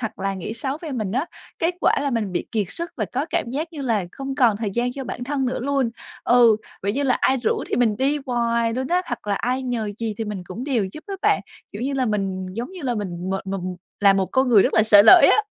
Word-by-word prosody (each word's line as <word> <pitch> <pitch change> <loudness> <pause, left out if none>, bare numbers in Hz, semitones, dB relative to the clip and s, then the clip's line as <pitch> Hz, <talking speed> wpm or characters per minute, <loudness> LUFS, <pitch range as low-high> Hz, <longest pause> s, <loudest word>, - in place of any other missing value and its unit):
hoặc 220 -2 -5
là 195 0 -2
nghĩ 190 +3 -5
xấu 265 +4 -3
về 310 - -5
mình 215 -6 -3
á. 265 +7 0 0.3
Kết 335 +2 0
quả - - +4
là 285 - 0
mình 220 -6 -1
bị - - -2
kiệt 210 -3 0
sức 340 - -4
và 215 - -1
có 270 +5 -1
cảm 340 - 0
giác 310 +6 -3
như 300 - -7
là 225 -7 0
không 270 0 -5
còn 245 -6 +3
thời 215 -1 -3
gian 240 +4 -1
cho 270 +1 -6
bản 245 - -5
thân 270 -1 -1
nữa 250 - -2
luôn. 270 -2 0 0.3
Ừ, 235 -2 +6 0.3
vậy 200 +1 0
như 280 - -1
là 260 -3 +3
ai 265 - +3
rủ 240 -3 -1
thì - - -1
mình 230 -4 +2
đi 275 +5 +1
hoài 235 -2 +1
luôn 260 +1 -2
á, 355 +2 +2
hoặc 245 -3 -5
là 205 - +1
ai 250 +5 -1
nhờ 235 -5 -2
gì 225 -2 -2
thì 225 - -2
mình 210 -3 -5
cũng 205 +8 -7
đều 255 -7 0
giúp 310 - -10
á 400 - -4
bạn, 415 -1 +3 0.3
kiểu 205 - -6
như 275 +2 -1
là, 260 -2 0
mình 195 -3 -2
giống 235 +6 -5
như 365 - -9
là 250 -3 -1
mình 185 -3 -4
mệt 195 0 -3
mà 195 +1 -2
mù 180 0 -5 0.2
là 200 -1 +6
một 195 -1 +1
con 260 0 +3
người 215 -5 +6
rất - - 0
là 220 - +5
sởi 210 -2 +7
lởi 365 +6 +9
á. - - +5
240 Hz, 285 wpm, -22 LUFS, 205-270 Hz, 0.3 s, lởi